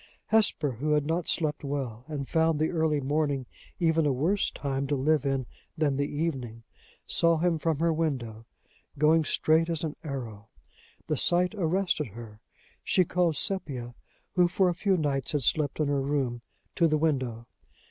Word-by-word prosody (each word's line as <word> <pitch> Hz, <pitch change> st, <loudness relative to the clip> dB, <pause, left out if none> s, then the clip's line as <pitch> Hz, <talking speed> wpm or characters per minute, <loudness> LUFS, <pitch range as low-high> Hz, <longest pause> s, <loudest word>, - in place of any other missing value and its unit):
Hesper, 210 Hz, -9 st, +2 dB
who 150 Hz, +2 st, +1 dB
had 150 Hz, -1 st, +2 dB
not 165 Hz, +2 st, -1 dB
slept 150 Hz, -2 st, 0 dB
well, 130 Hz, -5 st, -4 dB
and 145 Hz, -3 st, -4 dB
found 160 Hz, -1 st, +2 dB
the 155 Hz, +1 st, 0 dB
early 160 Hz, -3 st, +1 dB
morning 140 Hz, -1 st, 0 dB, 0.3 s
even 160 Hz, -3 st, +2 dB
a -, -, +3 dB
worse 165 Hz, +10 st, +1 dB
time 140 Hz, -1 st, -3 dB
to 145 Hz, -, 0 dB
live 145 Hz, +1 st, +1 dB
in 135 Hz, -2 st, 0 dB, 0.3 s
than 150 Hz, -3 st, +1 dB
the 140 Hz, +1 st, -1 dB
evening, 130 Hz, -7 st, -3 dB, 0.4 s
saw 170 Hz, -1 st, +3 dB
him 165 Hz, 0 st, +1 dB
from 160 Hz, -1 st, 0 dB
her 165 Hz, +2 st, +2 dB
window, 120 Hz, -9 st, -3 dB, 0.5 s
going 155 Hz, +2 st, +4 dB
straight 160 Hz, +2 st, +2 dB
as 165 Hz, -2 st, -2 dB
an 155 Hz, -2 st, -3 dB
arrow. 120 Hz, -8 st, -6 dB, 0.6 s
The 155 Hz, -2 st, -1 dB
sight 180 Hz, -, +2 dB
arrested 180 Hz, -5 st, 0 dB
her. 110 Hz, 0 st, -11 dB, 0.4 s
She 185 Hz, -, +3 dB
called 170 Hz, -3 st, +1 dB
Sepia, 130 Hz, -12 st, -2 dB, 0.4 s
who 180 Hz, -1 st, +4 dB
for 185 Hz, +1 st, +2 dB
a -, -, 0 dB
few 190 Hz, +2 st, +1 dB
nights 145 Hz, 0 st, -1 dB
had 145 Hz, -3 st, 0 dB
slept 145 Hz, +4 st, +1 dB
in 155 Hz, -, +2 dB
her 140 Hz, -1 st, +1 dB
room, 135 Hz, -4 st, -1 dB, 0.4 s
to 170 Hz, -, +5 dB
the 155 Hz, -1 st, +2 dB
window. 130 Hz, -7 st, -1 dB
150 Hz, 170 wpm, -28 LUFS, 135-165 Hz, 0.6 s, to